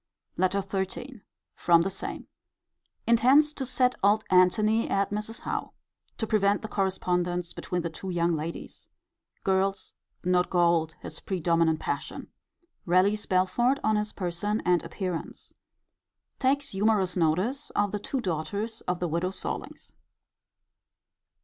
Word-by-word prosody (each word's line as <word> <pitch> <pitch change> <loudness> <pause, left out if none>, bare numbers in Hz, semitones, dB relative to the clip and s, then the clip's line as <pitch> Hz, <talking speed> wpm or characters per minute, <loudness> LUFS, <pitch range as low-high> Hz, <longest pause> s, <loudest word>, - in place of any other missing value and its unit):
LETTER 185 +2 +1
XIII. 200 +6 -4 0.3
From 170 -1 +4
the 195 - -2
same. 190 - -4 0.8
Intends 260 +6 +5
to 265 -4 -4
set 250 0 +2
old 210 +2 +4
Antony 215 +5 +4
at 195 0 +1
Mrs. 215 +2 -4
Howe, - - -3 0.4
to 225 - -1
prevent 205 -2 +2
the - - -3
correspondence 180 -3 -1
between 180 -1 -3
the 170 - -2
two 190 +4 -7
young 170 -1 +1
ladies. 160 +2 -6 0.5
Girl, 195 0 +2 0.5
not 180 0 +2
gold, 170 -3 +2
his - - -7
predominant 165 -3 +1
passion. 145 - -4 0.6
Rallies 195 +4 +3
Belford 240 +9 +2
on 215 0 +3
his 210 0 0
person 195 +4 -2
and 175 -2 +3
appearance. 185 -4 -5 0.9
Takes 280 +1 +1
humourous 195 -2 +1
notice 185 - 0
of 205 -1 +2
the 210 - -2
two 260 +5 -3
daughters 200 +5 -3
of 180 -1 0
the 180 - -1
widow 170 +3 -1
Sorlings. 190 - -6
190 Hz, 130 wpm, -27 LUFS, 175-215 Hz, 0.9 s, Intends